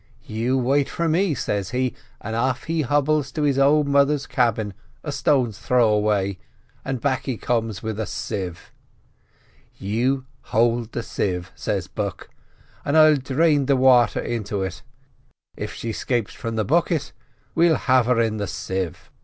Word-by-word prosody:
'You 115 Hz, +4 st, -1 dB
wait 135 Hz, +2 st, +2 dB
for 170 Hz, -, -1 dB
me,' 165 Hz, 0 st, +2 dB
says 100 Hz, -5 st, -2 dB
he; 125 Hz, 0 st, -1 dB, 0.3 s
and 110 Hz, +2 st, -5 dB
off 130 Hz, +2 st, 0 dB
he 165 Hz, -1 st, -1 dB
hobbles 145 Hz, +1 st, +1 dB
to 155 Hz, -, -1 dB
his 140 Hz, -2 st, +2 dB
old 145 Hz, +2 st, +4 dB
mother's 140 Hz, 0 st, +3 dB
cabin 115 Hz, -5 st, 0 dB, 0.3 s
a -, -, -3 dB
stone's 120 Hz, -7 st, +1 dB
throw 120 Hz, -2 st, +3 dB
away, 100 Hz, -3 st, +1 dB, 0.4 s
and 135 Hz, -2 st, -3 dB
back 130 Hz, 0 st, -1 dB
he 130 Hz, -4 st, -2 dB
comes 115 Hz, -4 st, -2 dB
with 110 Hz, -1 st, -3 dB
a 110 Hz, -, -2 dB
sieve. 95 Hz, -6 st, -5 dB, 1.1 s
"'You 125 Hz, +7 st, 0 dB, 0.2 s
hold 115 Hz, 0 st, +1 dB
the 120 Hz, -, -3 dB
sieve,' 90 Hz, -5 st, -3 dB
says -, -, -3 dB
Buck, -, -, -5 dB, 0.5 s
'and 140 Hz, +3 st, +1 dB
I'll 155 Hz, -1 st, +7 dB
drain 140 Hz, +1 st, +2 dB
the 140 Hz, -, +4 dB
water 125 Hz, -3 st, +4 dB
into 105 Hz, -4 st, -3 dB
it; 90 Hz, -1 st, -5 dB, 0.7 s
if -, -, -5 dB
she 115 Hz, -, -4 dB
'scapes 115 Hz, +1 st, -2 dB
from 115 Hz, -1 st, -5 dB
the 110 Hz, -2 st, 0 dB
bucket 160 Hz, -, +1 dB, 0.4 s
we'll 165 Hz, -1 st, +4 dB
have 130 Hz, -2 st, +2 dB
her 125 Hz, -2 st, +3 dB
in 110 Hz, -2 st, +1 dB
the 100 Hz, -2 st, -2 dB
sieve. 90 Hz, 0 st, -4 dB
125 Hz, 160 wpm, -23 LUFS, 110-140 Hz, 1.1 s, I'll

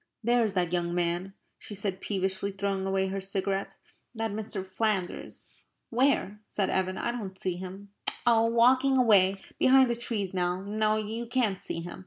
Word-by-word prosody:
"There 240 Hz, +1 st, +3 dB
is 210 Hz, -3 st, -1 dB
that 180 Hz, -2 st, 0 dB
young 175 Hz, -1 st, 0 dB
man," 175 Hz, +2 st, -1 dB, 0.2 s
she 210 Hz, -, -8 dB
said, 195 Hz, -1 st, -2 dB
peevishly, 190 Hz, 0 st, -1 dB
throwing 195 Hz, -1 st, -2 dB
away 190 Hz, 0 st, 0 dB
her 195 Hz, 0 st, -3 dB
cigarette, 195 Hz, 0 st, -2 dB, 0.4 s
"that 225 Hz, -1 st, -2 dB
Mr. 205 Hz, -2 st, -4 dB
Flanders." 190 Hz, -1 st, -3 dB, 0.3 s
"Where?" 240 Hz, -5 st, +1 dB
said 200 Hz, -2 st, -1 dB
Evan. 185 Hz, 0 st, 0 dB
"I 235 Hz, -, -1 dB
don't 195 Hz, -6 st, -6 dB
see 185 Hz, -2 st, -1 dB
him." 190 Hz, +2 st, -8 dB, 0.4 s
"Oh, 230 Hz, -2 st, +5 dB
walking 255 Hz, +3 st, +4 dB
away 200 Hz, -6 st, +5 dB, 0.2 s
behind 260 Hz, -1 st, +6 dB
the -, -, 0 dB
trees 220 Hz, -5 st, -1 dB
now. 180 Hz, 0 st, 0 dB
No, 215 Hz, +1 st, +1 dB
you 220 Hz, +2 st, -4 dB
can't 225 Hz, -6 st, +1 dB
see 165 Hz, -, -3 dB
him. 175 Hz, +1 st, -8 dB
200 Hz, 170 wpm, -28 LUFS, 190-225 Hz, 0.4 s, behind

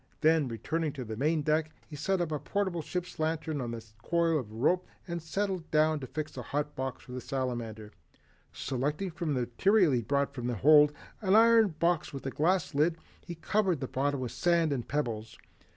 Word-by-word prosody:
Then 160 Hz, -2 st, +4 dB
returning 150 Hz, +7 st, -2 dB
to 130 Hz, -4 st, -6 dB
the 110 Hz, 0 st, -5 dB
main 150 Hz, +5 st, +1 dB
deck 155 Hz, +1 st, +1 dB, 0.2 s
he 150 Hz, -, -9 dB
set 185 Hz, +5 st, 0 dB
a -, -, +2 dB
portable 190 Hz, -2 st, -1 dB
ship's 180 Hz, +3 st, -5 dB
lantern 155 Hz, -2 st, -1 dB
on 120 Hz, -1 st, -3 dB
a 115 Hz, -, -7 dB, 0.2 s
coil 165 Hz, +3 st, +2 dB
of 110 Hz, -6 st, -7 dB
rope 150 Hz, +11 st, +1 dB, 0.2 s
and 170 Hz, -1 st, -3 dB
settled 185 Hz, +1 st, -2 dB
down 155 Hz, 0 st, +3 dB
to 130 Hz, -, -7 dB
fix 155 Hz, +3 st, -5 dB
a -, -, -5 dB
hot 150 Hz, +1 st, -3 dB
box 130 Hz, 0 st, -4 dB
for 125 Hz, -, -13 dB
the 125 Hz, 0 st, -5 dB
Salamander. 120 Hz, -6 st, -4 dB, 0.6 s
Selecting 145 Hz, +8 st, -2 dB
from 165 Hz, -3 st, -2 dB
the 125 Hz, -, 0 dB
material 175 Hz, -, +3 dB
he 130 Hz, -, +2 dB
had 115 Hz, -, -8 dB
brought 140 Hz, +1 st, +1 dB
from 125 Hz, -3 st, -4 dB
the 125 Hz, -, -1 dB
hold 150 Hz, +5 st, +6 dB, 0.3 s
an 195 Hz, -1 st, +3 dB
iron 225 Hz, -5 st, +6 dB
box 170 Hz, -1 st, +1 dB
with 135 Hz, -, -7 dB
a 135 Hz, -, -2 dB
glass 175 Hz, +4 st, +1 dB
lid, 155 Hz, +4 st, +2 dB, 0.3 s
he 175 Hz, -, -5 dB
covered 185 Hz, 0 st, +1 dB
the 130 Hz, -, -3 dB
bottom 140 Hz, +1 st, -1 dB
with 125 Hz, -2 st, -3 dB
sand 165 Hz, +4 st, +2 dB
and 125 Hz, -4 st, -4 dB
pebbles. 115 Hz, -7 st, -3 dB
150 Hz, 200 wpm, -30 LUFS, 130-170 Hz, 0.6 s, hold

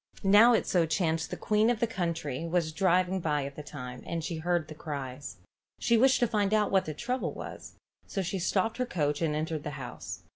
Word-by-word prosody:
Now 210 Hz, +5 st, +7 dB
it 225 Hz, -, +2 dB
so 170 Hz, -3 st, +2 dB
chanced 160 Hz, -1 st, 0 dB
the -, -, -5 dB
queen 215 Hz, +1 st, +2 dB
of 240 Hz, -2 st, +1 dB
the 235 Hz, -, +3 dB
country 170 Hz, -, -3 dB
was 165 Hz, -2 st, 0 dB
driving 185 Hz, +1 st, +2 dB
by 150 Hz, -4 st, 0 dB
at 140 Hz, 0 st, -7 dB
that 150 Hz, -, -9 dB
time, 125 Hz, -3 st, -7 dB
and 165 Hz, -1 st, -3 dB
she 165 Hz, 0 st, -3 dB
heard 170 Hz, 0 st, 0 dB
the -, -, -8 dB
cries. 140 Hz, -3 st, -6 dB, 0.4 s
She 235 Hz, -, +3 dB
wished 260 Hz, +3 st, +5 dB
to 240 Hz, -, +4 dB
find 210 Hz, -2 st, +1 dB
out 210 Hz, -1 st, +2 dB
what 190 Hz, -1 st, +3 dB
the 155 Hz, -, -5 dB
trouble 250 Hz, -, -2 dB
was, -, -, -9 dB, 0.3 s
so 195 Hz, -, -2 dB
she 185 Hz, +2 st, -2 dB
stopped 195 Hz, +5 st, 0 dB
her 250 Hz, -, 0 dB
coach 150 Hz, -7 st, -1 dB
and 155 Hz, -2 st, +1 dB
entered 155 Hz, 0 st, -2 dB
the -, -, -3 dB
house. -, -, -7 dB
170 Hz, 220 wpm, -29 LUFS, 155-210 Hz, 0.4 s, Now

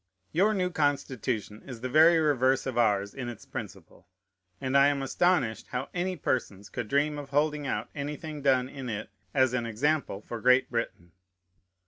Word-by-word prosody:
Your 205 Hz, +6 st, +3 dB
new 180 Hz, -2 st, 0 dB
Constitution 130 Hz, -, -1 dB
is 125 Hz, -4 st, -9 dB
the 130 Hz, -, -2 dB
very 160 Hz, +5 st, +6 dB
reverse 135 Hz, -4 st, +2 dB
of 130 Hz, -3 st, -3 dB
ours 100 Hz, -4 st, +2 dB
in 125 Hz, -3 st, -5 dB
its 120 Hz, -, -9 dB
principle; -, -, -9 dB, 0.5 s
and 130 Hz, 0 st, -2 dB
I 140 Hz, 0 st, +7 dB
am 140 Hz, -1 st, 0 dB
astonished 175 Hz, -6 st, +1 dB
how 125 Hz, +2 st, -4 dB
any 180 Hz, +1 st, -1 dB
persons 105 Hz, -, -2 dB
could 120 Hz, 0 st, -4 dB
dream 145 Hz, +4 st, +1 dB
of 140 Hz, -1 st, -8 dB
holding 150 Hz, 0 st, +1 dB
out -, -, -2 dB
anything 150 Hz, +1 st, -5 dB
done 130 Hz, -2 st, +3 dB
in 135 Hz, -2 st, -7 dB
it 105 Hz, -1 st, -5 dB, 0.2 s
as 130 Hz, -2 st, +3 dB
an 120 Hz, -2 st, -1 dB
example 120 Hz, -2 st, -1 dB
for 120 Hz, -2 st, -6 dB
Great 125 Hz, +1 st, +4 dB
Britain. 115 Hz, -7 st, -3 dB
135 Hz, 170 wpm, -28 LUFS, 120-150 Hz, 0.5 s, I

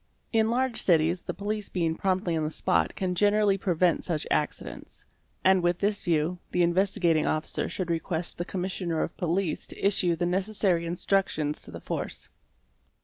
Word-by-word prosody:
| -, -, -43 dB
In 220 Hz, -1 st, +3 dB
large 245 Hz, -1 st, 0 dB
cities 170 Hz, 0 st, +3 dB
the -, -, -5 dB
police 210 Hz, 0 st, -3 dB
being 165 Hz, -3 st, 0 dB
promptly 185 Hz, -1 st, 0 dB
on 160 Hz, -, 0 dB
the 155 Hz, -, -1 dB
spot 180 Hz, +3 st, +1 dB
can 185 Hz, -1 st, -1 dB
generally 205 Hz, +2 st, +3 dB
prevent 180 Hz, -2 st, +2 dB
such 160 Hz, -4 st, -1 dB
accidents; 150 Hz, -, -3 dB, 0.4 s
and 190 Hz, 0 st, +5 dB
with 175 Hz, 0 st, +1 dB
this 205 Hz, +1 st, 0 dB
view, 170 Hz, +1 st, +1 dB
the 180 Hz, -, +2 dB
Investigating 170 Hz, -3 st, +2 dB
Officer 155 Hz, 0 st, -1 dB
should 180 Hz, -3 st, -3 dB
request 165 Hz, +1 st, -3 dB
the -, -, 0 dB
Commissioner 180 Hz, -3 st, -2 dB
of -, -, -5 dB
Police 175 Hz, 0 st, -1 dB
to -, -, -4 dB
issue 185 Hz, -4 st, +3 dB
the 175 Hz, -, -1 dB
necessary 185 Hz, -2 st, +1 dB
instruc 195 Hz, +3 st, +1 dB
tions 150 Hz, -1 st, -3 dB
to -, -, -8 dB
the -, -, -9 dB
force. -, -, -4 dB
180 Hz, 175 wpm, -27 LUFS, 165-195 Hz, 0.4 s, and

